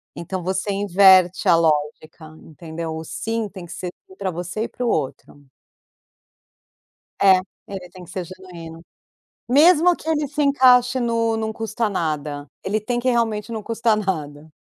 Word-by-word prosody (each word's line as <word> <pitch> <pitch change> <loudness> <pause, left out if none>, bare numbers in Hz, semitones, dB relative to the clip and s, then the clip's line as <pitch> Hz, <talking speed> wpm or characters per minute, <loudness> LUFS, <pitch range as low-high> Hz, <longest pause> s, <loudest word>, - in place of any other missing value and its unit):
Então 175 +1 -5
você 190 +2 -2
inverte 190 -2 +4
a 170 - +6
lógica, 155 0 -1 0.2
entendeu? 160 0 -7
O 160 - -6
sim 225 +6 -3
tem 185 -3 -10
que - - -13
ser 180 -1 -5 0.2
sim 190 - -16
pra 190 -2 -3
você 175 +5 -5
e - - -2
pro 245 -1 -4
outro. 145 - -4 1.7
É, 190 -1 +7 0.3
ele 185 -3 -8
tem 185 0 -13
que - - -17
ser 185 -1 -4
genuíno. 170 -3 -11 0.7
Mesmo 335 +5 +5
que - - -15
ele 300 -3 0
se 295 +1 -2
encaixe 255 -2 +4
no 230 -1 0
"Não 220 0 -2
custa 225 0 -2
nada", 150 -5 -3 0.2
ele 210 +3 -1
tem 240 +3 -2
que 255 - -1
realmente 225 -2 -1
não 220 -2 -4
custa 225 0 +1
nada. 155 -6 -4
190 Hz, 160 wpm, -21 LUFS, 165-230 Hz, 1.7 s, É